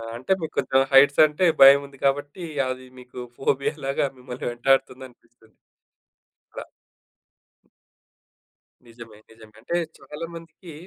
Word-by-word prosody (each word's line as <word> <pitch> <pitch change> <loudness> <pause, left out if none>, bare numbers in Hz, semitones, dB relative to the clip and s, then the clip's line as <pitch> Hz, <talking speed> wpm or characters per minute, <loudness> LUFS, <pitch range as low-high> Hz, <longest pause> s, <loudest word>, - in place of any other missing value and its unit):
అంటే 125 +9 -6
మీకు 160 - -6
కొంచెం 130 0 +2
హైట్స్ 140 +1 +5
అంటే 150 +4 -1 0.2
భయం 135 +1 +9
ఉంది 140 0 -18
కాబట్టి, 145 +5 -2 0.3
అది 130 0 -6
మీకు 125 0 -16 0.2
ఫోబియాలాగా 140 +1 -2
మిమ్మల్ని 125 0 -9
వెంటాడుతుందనిపిస్తుంది. 120 -2 -3 1.0
అలా. - - -8 2.2
నిజమే. 115 -2 -14
నిజమే. 110 -1 -18
అంటే 150 +9 -4 0.2
చాలా 150 +3 -8
మందికి 165 +1 -13
135 Hz, 105 wpm, -23 LUFS, 120-145 Hz, 2.2 s, భయం